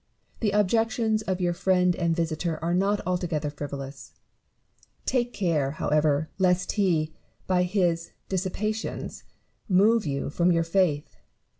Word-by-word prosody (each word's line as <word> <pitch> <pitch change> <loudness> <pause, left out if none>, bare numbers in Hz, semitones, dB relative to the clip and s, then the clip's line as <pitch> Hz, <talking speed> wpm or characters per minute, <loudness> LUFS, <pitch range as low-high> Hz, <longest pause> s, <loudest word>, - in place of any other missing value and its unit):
The 220 - +1
objections 220 +2 +2
of 190 -3 -2
your 175 -1 +1
friend 180 0 +2
and 170 -1 0
visitor 165 0 -1
are 170 +1 0
not 200 +3 +2
altogether 170 -5 -1
frivolous; 140 -1 -7 0.9
take 245 -2 +1
care, 155 - 0
however, 150 0 +2
lest 180 -1 +2
he, 165 -7 +1 0.3
by 185 -1 +2
his 175 -3 0 0.2
disceptations, 205 +4 -3 0.5
move 210 +2 +4
you 140 0 -2
from 175 +3 +2
your 165 -1 +3
faith. 165 -4 0
180 Hz, 125 wpm, -26 LUFS, 160-195 Hz, 0.9 s, move